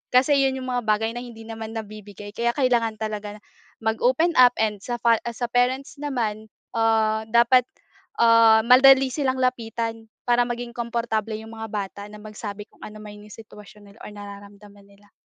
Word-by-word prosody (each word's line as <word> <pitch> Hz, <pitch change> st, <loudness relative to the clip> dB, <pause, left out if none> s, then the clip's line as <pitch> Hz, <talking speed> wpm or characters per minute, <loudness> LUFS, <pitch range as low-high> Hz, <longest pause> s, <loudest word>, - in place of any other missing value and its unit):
kasi 275 Hz, +3 st, +4 dB
’yon 270 Hz, -1 st, +2 dB
’yong 260 Hz, 0 st, -6 dB
mga 245 Hz, -1 st, -1 dB
bagay 220 Hz, +1 st, +1 dB
na 240 Hz, -, -6 dB
hindi 235 Hz, -2 st, -10 dB
naman 225 Hz, 0 st, -8 dB
nabibigay. 210 Hz, -2 st, -9 dB
Kaya 235 Hz, +2 st, -1 dB
kailangan 240 Hz, -5 st, +1 dB
talaga 210 Hz, -1 st, -5 dB, 0.5 s
mag-open 250 Hz, +9 st, +2 dB
up 245 Hz, -1 st, +7 dB
and 215 Hz, -2 st, 0 dB
sa 240 Hz, +5 st, -4 dB
fa 230 Hz, -1 st, +2 dB
sa 235 Hz, +1 st, -3 dB
parents 260 Hz, +3 st, 0 dB
naman 225 Hz, -7 st, -3 dB, 0.3 s
ah, 220 Hz, -1 st, +1 dB
dapat 235 Hz, +2 st, +4 dB, 0.5 s
ah, 230 Hz, -1 st, +6 dB
madali 265 Hz, +2 st, +6 dB
silang 260 Hz, -2 st, -1 dB
lapitan, 230 Hz, -2 st, -3 dB, 0.2 s
para 240 Hz, 0 st, +2 dB
maging 240 Hz, 0 st, -5 dB
komportable 230 Hz, -2 st, -2 dB
’yong 220 Hz, +1 st, -9 dB
mga 225 Hz, 0 st, -7 dB
bata 200 Hz, -1 st, -5 dB
na 210 Hz, -, -12 dB
magsabi 210 Hz, -1 st, -8 dB
kung -, -, -27 dB
anuman 210 Hz, -1 st, -10 dB
’yong 210 Hz, -, -15 dB
sitwasyon 210 Hz, -1 st, -15 dB
nila 205 Hz, -, -21 dB
or -, -, -9 dB
nararamdaman 200 Hz, 0 st, -12 dB
nila. 200 Hz, +1 st, -23 dB
225 Hz, 165 wpm, -23 LUFS, 210-245 Hz, 0.5 s, up